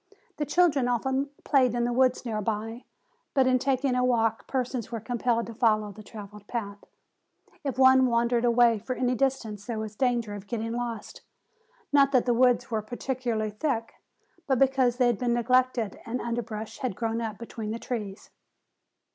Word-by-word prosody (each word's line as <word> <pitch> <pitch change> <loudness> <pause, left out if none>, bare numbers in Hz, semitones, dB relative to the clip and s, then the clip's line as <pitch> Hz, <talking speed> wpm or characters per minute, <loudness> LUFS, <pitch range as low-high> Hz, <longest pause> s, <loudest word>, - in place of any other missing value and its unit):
The 295 - -2
children 295 -6 +3
often 265 +3 0
played 255 -4 +3
in 240 - +1
the 240 - 0
woods 255 0 +2
near 215 -3 -2
by, 225 +3 -3 0.5
but 265 -2 +4
in 255 0 +3
taking 265 0 +1
a 250 0 +1
walk 225 -3 +1
persons 250 -3 -2
were 230 - -3
compelled 235 +1 0
to 230 - -8
follow 215 -2 +2
the 215 - -12
traveled 210 -1 -11
path. 205 -4 -4 0.8
If 275 -3 -3
one 260 0 +6
wandered 235 0 +1
away 235 -2 +4
for 255 +5 -4
any 250 0 +1
distance 235 -5 -1
there 235 -2 -3
was 215 -1 -5
danger 240 -4 0
of 205 -1 -8
getting 225 +1 -3
lost. 235 -2 -5 0.7
Not 275 -1 +5
that 255 - +4
the 245 - +3
woods 245 0 +3
were 220 -1 0
particularly 240 -1 -3
thick, 230 0 -2 0.5
but 265 -2 +2
because 260 -2 +3
they 250 - +3
had 240 -4 +2
been 240 -1 +1
neglected 245 -3 +1
and 240 +2 -3
underbrush 225 -2 -4
had 250 -7 -2
grown 230 +1 -2
up 220 -3 -4
between 225 -2 -6
the 225 - -2
trees. 215 -5 -6
240 Hz, 175 wpm, -27 LUFS, 220-255 Hz, 0.8 s, one